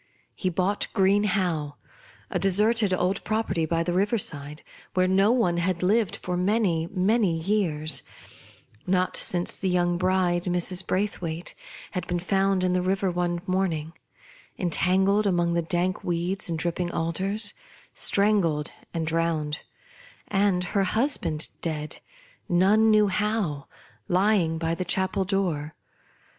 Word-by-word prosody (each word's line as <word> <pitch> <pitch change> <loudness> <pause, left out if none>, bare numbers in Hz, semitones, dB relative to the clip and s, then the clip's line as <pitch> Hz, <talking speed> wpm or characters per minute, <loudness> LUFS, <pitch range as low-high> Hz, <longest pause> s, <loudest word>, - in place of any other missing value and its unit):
He 185 - -2
bought 185 +3 0
Green 200 0 +3
Howe, 170 -7 -1 0.6
a - - 0
deserted 210 +2 +3
old 185 +1 0
property 205 -7 -1
by 165 +1 0
the 175 +1 -2
river 205 +5 +2
side, 150 -5 -3 0.3
where 185 0 +3
no 195 +2 +3
one 220 -9 +2
had 175 +1 -1
lived 210 +2 +2
for 180 - -4
many 180 -3 +1 0.5
years; 160 -5 0 0.9
not 185 0 +1
since 175 -1 +2
the 190 - -1
young 175 -1 +1
bride, 180 -1 +1
Mrs. 180 +1 0
Braithwaite, 180 -4 -2 0.4
had 180 - -4
been 175 - -1
found 195 +1 +1
in 180 0 +1
the 180 - +1
river 190 +1 0
one 175 0 -2
morning, 175 -5 -1 0.6
entangled 190 +4 +2
among 175 -2 +1
the 170 - +1
dank 175 +2 -1
weeds 180 +3 -2
and 165 - -1
dripping 175 +2 -2
alders, 195 +6 -1 0.4
strangled 190 -7 +1 0.2
and 165 -1 -1
drowned, 160 -2 -1 0.7
and 195 -2 +2
her 200 -2 +3
husband 185 - 0
dead 155 -2 -4 0.3
— - - -32
none 200 +5 +4
knew 215 -1 +5
how 200 -7 -1 0.2
— - - -31
lying 180 -3 +2
by 165 0 -1
the 185 - -2
chapel 190 +2 0
door. 175 -6 -1
180 Hz, 135 wpm, -26 LUFS, 170-195 Hz, 0.9 s, knew